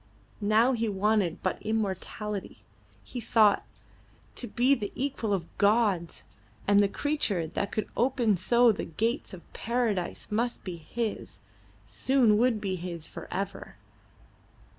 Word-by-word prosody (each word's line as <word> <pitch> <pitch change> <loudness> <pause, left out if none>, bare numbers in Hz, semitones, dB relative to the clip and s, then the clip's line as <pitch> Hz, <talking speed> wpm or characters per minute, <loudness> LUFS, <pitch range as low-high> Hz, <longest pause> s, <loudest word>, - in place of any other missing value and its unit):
Now 215 +5 +4
he 230 -3 0
wanted 200 -3 +1
but 185 - -1
immortality, 210 -1 -3 0.4
he 245 - -6
thought, 215 -3 +4 0.7
to 245 - -4
be 245 +5 +3
the 210 -7 -2
equal 255 -5 -2
of 180 -4 -2
gods, 200 -5 +2 0.4
and 200 0 +5
the 205 - +5
creature 220 - -1
that 200 +5 -3
could 220 -2 -2
open 240 -3 +2
so 235 +6 +4
the 205 - -3
gates 225 +9 -2
of 180 -3 -12
paradise 225 -7 -2
must 235 +3 -1
be 180 -3 -5
his 225 +7 -4 0.5
soon 245 -6 +3
would 240 -2 +3
be 190 -2 -2
his 170 -2 -6
for - - -9
ever! 195 +1 -4
210 Hz, 135 wpm, -28 LUFS, 195-235 Hz, 0.7 s, and